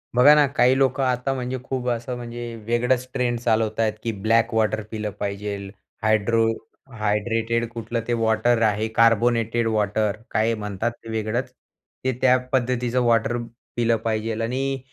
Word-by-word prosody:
बघा 140 +5 +8
ना, 150 - +5
काही 130 -1 +3
लोकं 135 0 +2
आता, 130 +1 0
म्हणजे 125 0 -3
खूप 130 -1 -4
असं, 120 +1 -2
म्हणजे 120 -1 -6
वेगळंच 125 +2 +1
ट्रेंड 120 -2 0
चालवत 110 -2 0
आहेत, 110 -1 +2
की 115 - -1
ब्लॅक 115 +1 +2
वॉटर 110 0 +1
पिलं 110 -1 -3
पाहिजे, 100 0 -3 0.5
हायड्रो 110 +1 +3 0.5
हायड्रेटेड 115 +2 0
कुठलं 115 0 -4
ते 120 - +1
वॉटर 115 +1 +2
आहे, 110 0 +2
कार्बोनेटेड 115 0 +3
वॉटर, 105 -1 0
काय 115 +1 +2
म्हणतात 105 +2 -3
ते, 115 - -10
वेगळंच 110 +3 -2 0.5
ते, 130 - +1
त्या 130 0 +5
पद्धतीचं 125 -1 +1
वॉटर 120 0 +2 0.4
पिलं 115 -1 +2
पाहिजे. 110 0 -1
आणि 135 +3 -1
115 Hz, 150 wpm, -23 LUFS, 110-125 Hz, 0.5 s, बघा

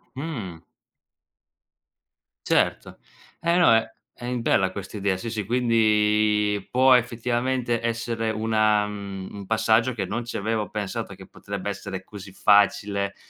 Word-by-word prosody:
Mh. 115 - -6 1.8
Certo. - - 0 0.4
Eh, 170 +1 +1
no, 175 -9 +6
è 115 0 +1 0.2
è 120 - -9
in 125 -1 -2
bella 95 -4 +2
questa 100 +2 -7
idea. 100 -2 0
Sì, 115 +5 -5
sì, 105 -3 -3
quindi 105 -3 +2
può 130 +1 +5
effettivamente 120 0 0
essere 115 -1 -2
una 110 -1 +2
mhmm, 100 -2 -7
un 100 - -8
passaggio 110 +2 +2
che 100 -4 -3
non 120 +6 -3
ci 120 - -5
avevo 105 -1 -2
pensato 105 0 -4
che 95 0 -12
potrebbe 100 +1 -6
essere 95 -1 -6
così 100 -2 -11
facile, 100 0 +2
110 Hz, 135 wpm, -24 LUFS, 100-115 Hz, 1.8 s, no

